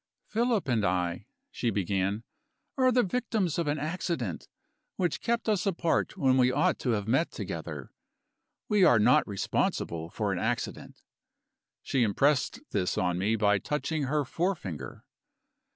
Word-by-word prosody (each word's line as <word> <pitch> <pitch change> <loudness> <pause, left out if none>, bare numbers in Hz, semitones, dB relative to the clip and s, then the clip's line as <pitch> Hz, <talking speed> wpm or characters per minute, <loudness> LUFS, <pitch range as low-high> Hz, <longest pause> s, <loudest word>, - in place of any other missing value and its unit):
"Philip 230 - 0
and 115 -5 +1
I," 90 -2 -1 0.2
she 120 - -1
began, 100 +1 -1 0.5
"are 255 -1 +4
the 245 0 +4
victims 210 - -1
of 170 - -1
an 145 +1 0
accident, 165 +3 -3 0.5
which 175 -4 -1
kept 235 0 -1
us 205 -3 +1
apart 170 -3 0
when 130 -2 +3
we 125 -1 +4
ought 145 +3 +1
to 125 - -2
have 105 -1 -2
met 135 +9 +2
together - - -6 0.8
we 210 -3 +3
are 120 - +6
not 105 - +4
responsible 85 -4 -1
for - - -1
an - - -2
accident." - - -3 0.8
She 135 - 0
impressed 140 - +2
this 90 -2 0
on 90 -1 0
me 105 +4 +1
by 105 -2 +3
touching 150 - -2
her 145 +1 0
forefinger. 125 - -3
135 Hz, 145 wpm, -29 LUFS, -, 0.8 s, are